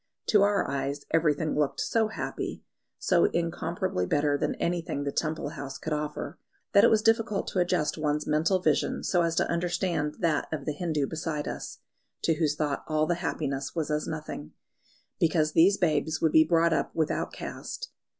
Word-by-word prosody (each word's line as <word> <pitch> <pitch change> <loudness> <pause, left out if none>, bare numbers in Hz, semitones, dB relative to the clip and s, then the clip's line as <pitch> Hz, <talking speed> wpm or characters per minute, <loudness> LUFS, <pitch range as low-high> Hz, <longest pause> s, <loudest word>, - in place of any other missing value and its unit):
To 210 -3 +5
our 205 0 +3
eyes 140 +1 -3
everything 155 -1 +2
looked 150 -2 0
so 225 -1 +1
happy, 220 - -5 0.3
so 175 -2 +3
incomparably 170 - -1
better 145 0 +2
than - - -1
anything 170 -4 -2
the 140 - -2
Temple 155 0 -2
house 140 -3 -7
could 160 - -3
offer, 150 +1 -4 0.3
that 200 - +7
it - - +7
was 215 -1 +3
difficult 225 -2 +2
to 185 - -1
adjust 175 -3 +1
one's 150 0 0
mental 155 +5 +2
vision 185 - 0
so 175 - +2
as 165 -1 +1
to - - +2
understand 170 -3 -1
that 165 -6 0
of 155 - -4
the 150 - 0
Hindu 155 -2 -1
beside 155 -1 -3
us, - - -6 0.4
to 165 - +3
whose 155 -2 0
thought 150 -2 -1
all 155 0 +2
the 175 - +1
happiness 140 -5 -2
was 155 -2 -1
as 150 0 -1
nothing, 155 - -6 0.7
because 160 -2 +2
these 175 +6 +5
babes 160 -2 +1
would 160 -2 +2
be 155 - +7
brought 165 0 +3
up - - -1
without 160 -2 0
caste. - - -7
160 Hz, 180 wpm, -28 LUFS, 150-175 Hz, 0.7 s, that